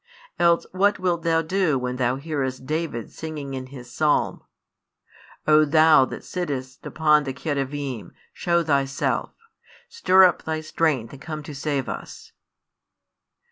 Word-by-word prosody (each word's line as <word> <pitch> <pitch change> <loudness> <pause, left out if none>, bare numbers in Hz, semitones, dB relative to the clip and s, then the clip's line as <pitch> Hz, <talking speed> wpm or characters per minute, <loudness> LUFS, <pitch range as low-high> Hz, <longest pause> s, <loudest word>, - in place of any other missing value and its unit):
Else 170 -1 +3
what 200 +2 +2
wilt 175 -2 0
thou 165 0 +1
do 170 -3 +1
when 125 0 -3
thou 125 0 +1
hearest 135 -3 -3
David 155 -7 -3
singing 150 -4 -6
in 130 -1 -5
his 125 -2 -11
psalm: 150 -1 +1 1.1
|106 - - +3
O 155 0 +6
Thou 155 -2 +6
that - - -8
sittest 135 -7 -5
upon 150 -2 +3
the 135 -2 -4
Cherubim, 140 -4 -4 0.2
shew 170 -1 +1
Thyself; 140 -3 0 0.5
stir 190 - +4
up 180 - +4
Thy 160 0 -3
strength 155 -7 -1
and 140 - -12
come 155 -2 -6
to 150 - -8
save 140 -1 -2
us? - - -8
150 Hz, 140 wpm, -24 LUFS, 135-165 Hz, 1.1 s, O